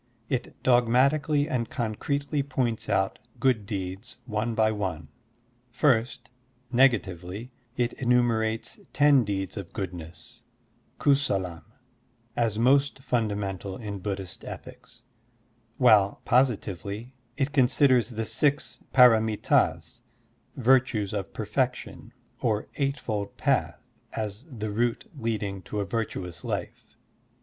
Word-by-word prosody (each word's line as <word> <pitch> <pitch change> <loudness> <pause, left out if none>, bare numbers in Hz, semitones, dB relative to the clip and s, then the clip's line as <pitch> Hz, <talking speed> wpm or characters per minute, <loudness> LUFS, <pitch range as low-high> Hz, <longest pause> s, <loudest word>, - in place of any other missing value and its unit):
It 130 -2 -2
dogmatically 135 +5 +3
and 120 -6 -1
concretely 140 +5 -2
points 125 -5 -2
out 95 0 +1 0.2
good 125 -6 +2
deeds 95 +2 -5
one 110 0 -2
by 110 0 +3
one. 95 -8 -4 0.6
First, 120 -1 +1 0.4
nega 125 -2 +6
tively, 95 +7 -8 0.3
it 120 -1 0
entmierates 115 -3 +1
ten 145 -3 +5
deeds 100 -1 -3
of 95 -4 -7
goodness 90 -5 -7 0.6
{kusalam) 95 - +1 0.7
as 115 -3 +1
most 135 +4 +3
fundamental 100 -5 -2
in 105 -4 -6
Buddhist 95 -2 -5
ethics; 115 0 -10 0.7
while, 105 -6 +5
positively, 110 -2 0 0.2
it 140 0 0
considers 130 -3 +4
the 115 -2 -3
six 145 +5 0 0.2
p^ramit^s 110 -4 +4 0.5
(virtues 120 -5 +2
of 100 -3 -3
perfection) - - -3 0.3
or 110 -3 0
eightfold 125 -8 -2
path - - +1 0.4
as 105 +2 -4
the 110 -5 -5
route 120 - 0
leading 110 -6 -3
to 105 +3 -5
a 100 - -1
virtuous 95 -4 -4
life. - - -5
115 Hz, 105 wpm, -27 LUFS, 100-130 Hz, 0.7 s, nega